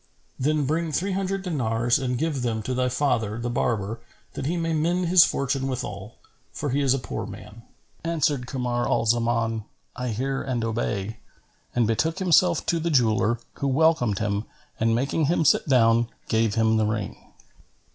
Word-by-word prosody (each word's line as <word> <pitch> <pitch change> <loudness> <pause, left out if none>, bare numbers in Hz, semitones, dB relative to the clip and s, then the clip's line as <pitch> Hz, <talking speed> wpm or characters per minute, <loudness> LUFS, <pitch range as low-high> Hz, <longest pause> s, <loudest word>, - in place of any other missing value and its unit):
Then 150 +2 +1
bring 160 +3 -1
three 185 +7 -1
hundred 195 0 -2
dinars 120 -8 +1
and 125 -2 -1
give 155 -2 -1
them 115 -3 -2
to 130 - -2
thy 125 0 +1
father 125 -5 0
the 120 +1 -3
barber 115 -2 -1 0.3
that 135 - -4
he 175 +3 -1
may 165 -1 -1
mend 170 +3 +1
his 180 -2 +8
fortune 135 0 -1
withal, 105 -5 -5 0.4
for 145 - -3
he 140 +2 +1
is 135 -1 +3
a - - 0
poor 110 -4 -5
man." 105 +1 -11 0.4
Answered 150 -6 0
Kamar 125 -2 -1
al - - +1
Zaman, 115 -1 +1 0.3
"I 125 - -4
hear 135 +4 -2
and 125 -4 -2
obey," 110 -2 -2 0.6
and 120 -1 +3
betook 155 +10 0
himself 180 -2 +3
to 170 - +1
the 170 +1 -1
jeweller, 120 -4 +2 0.2
who 140 - 0
welcomed 140 -6 +2
him 105 +1 -1 0.3
and 115 0 +2
making 140 +6 0
him 160 +1 +1
sit 145 - +3
down, 115 -2 +4 0.2
gave 110 -2 +1
him 110 0 +3
the 110 -1 +2
ring. 105 -2 -3
125 Hz, 175 wpm, -25 LUFS, 115-155 Hz, 0.6 s, his